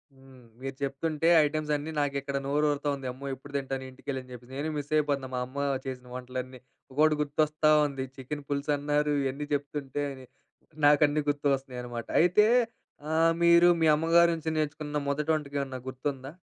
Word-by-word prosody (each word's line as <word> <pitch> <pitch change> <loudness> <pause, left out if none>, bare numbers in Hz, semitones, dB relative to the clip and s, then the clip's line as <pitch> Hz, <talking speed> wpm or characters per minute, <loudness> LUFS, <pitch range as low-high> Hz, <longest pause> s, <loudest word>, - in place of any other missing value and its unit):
హ్మ్. 135 -1 -17 0.2
మీరు 135 0 -5
చెప్తుంటే 150 +3 -1 0.2
ఐటమ్స్ 150 0 -2
అన్నీ 145 +2 -4
నాకు 145 -1 0
ఇక్కడ 140 0 -3
నోరు 145 +2 +1
ఊరుతావుంది. 140 -1 -2
అమ్మో! 130 +3 -10
ఎప్పుడు 140 +2 -14
తింటాను 135 -1 -4
ఇంటికెళ్ళి 130 +1 -5
అని 130 - -16
చెప్పేసి, 125 +1 -12
నేను 150 +3 -2
మిస్ 145 0 -5
అయిపోతున్నా. 140 -3 0
మా - - -1
అమ్మ 130 +2 -12 0.3
చేసిన 125 -1 -6
వంటలన్నీ, 130 0 -6 0.3
ఒకొకటి 155 +3 +3
గుర్తొస్తా 155 +1 +1 0.2
ఉంది. 135 -2 -3
చికెన్ 140 +2 -6
పులుసు 140 +1 -1
అన్నారు, 150 +1 +1
ఇవన్నీ 135 +2 -3
చెప్తుంటేనీ 140 -1 -3 0.6
నాకన్నీ 145 +1 +5
గుర్తొకొస్తున్నాయి 135 -3 -1
అన్నమాట. 120 -1 -6
అయితే 180 +5 +5 0.7
ఆ! - - 0 0.3
మీరు, 170 0 +7
మీ - - +4
అమ్మగారి 165 +2 +4
నుంచి 160 0 -4
నేర్చుకున్న 150 -1 -2
మొదటి 145 +2 -1
వంటకం 145 -2 -3
ఏమన్నా 135 -2 -5
గుర్తుందా? 135 +1 -4
145 Hz, 160 wpm, -28 LUFS, 135-150 Hz, 0.7 s, మీరు